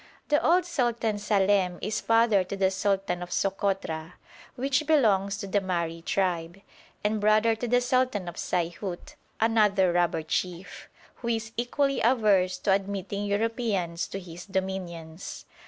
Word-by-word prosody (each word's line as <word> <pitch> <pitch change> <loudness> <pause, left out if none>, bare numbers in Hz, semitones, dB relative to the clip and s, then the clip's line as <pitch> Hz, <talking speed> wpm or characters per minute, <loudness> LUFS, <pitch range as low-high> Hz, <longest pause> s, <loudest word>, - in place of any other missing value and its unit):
The 295 - +3
old 355 +2 +4
Sultan 235 -9 0
Salem 200 -3 +2
is 215 +1 -2
father 225 -4 +4
to 195 - -5
the 190 -1 +2
sultan 195 -2 -1
of 180 - -6
Sokotra, 190 -5 -1 0.4
which 270 +3 0
belongs 200 -10 +3
to 200 - -5
the 200 +1 0
Mahri 170 -3 -2
tribe, 175 -1 -1 0.4
and 210 0 0
brother 215 +2 +4
to 245 - -3
the 245 +1 +3
sultan 250 -6 +1
of 175 - -5
Saihut, 175 - -3 0.3
another 210 -5 +3
robber 175 -2 +1
chief, 180 +3 -4 0.3
who 235 - -7
is 225 -1 -1
equally 275 +4 0
averse 210 -6 +3
to 200 - 0
admitting 200 +1 -2
Europeans 205 -5 -1
to 195 - -5
his 175 0 -10
dominions. 185 -3 -5
200 Hz, 140 wpm, -27 LUFS, 180-225 Hz, 0.4 s, old